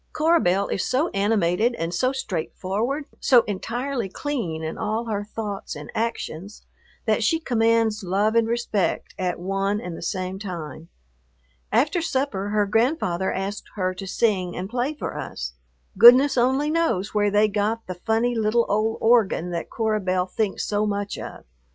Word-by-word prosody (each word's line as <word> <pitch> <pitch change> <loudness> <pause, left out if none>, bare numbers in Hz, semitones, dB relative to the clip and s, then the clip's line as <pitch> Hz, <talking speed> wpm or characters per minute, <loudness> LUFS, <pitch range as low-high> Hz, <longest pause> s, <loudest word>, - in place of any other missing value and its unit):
Cora 330 +2 +3
Belle 195 - +1
is 195 - -1
so 290 +7 +1
animated 205 +2 +1
and 165 -2 -3
so 255 +9 +1
straightforward, 225 - -3
so 250 -4 +5
entirely 235 +3 -3
clean 190 - -3
in 160 - -4
all 220 +2 -2
her 205 -3 -2
thoughts 205 -1 -5
and 145 0 -9
actions, 220 -4 -4 0.4
that - - +2
she 325 - +2
commands 230 -5 +2
love 200 +4 +1
and 230 -1 +3
respect 230 -4 -1
at 180 -2 -1
one 195 +3 -1
and 180 -5 -6
the - - -9
same 185 +2 -3
time. 170 -5 -7 0.8
After 295 +9 +2
supper 260 - -1
her 210 0 +2
grandfather 210 - +1
asked 195 +2 -4
her 185 -2 -1
to 190 +1 -7
sing 185 -3 0
and 185 +1 -3
play 250 +7 -2
for - - -5
us. 60 +1 -5 0.4
Goodness 250 +7 +8
only 265 +4 +2
knows 320 - 0
where 205 -1 +2
they 210 +1 +4
got 215 +2 -1
the 185 - -5
funny 225 +6 0
little 225 +1 +2
old 215 +2 0
organ 220 -7 +3
that 170 -1 -4
Cora 220 -2 0
Belle 185 -2 0
thinks 200 +2 -2
so 210 0 0
much 205 0 -3
of. - - -8
210 Hz, 165 wpm, -24 LUFS, 190-240 Hz, 0.8 s, Goodness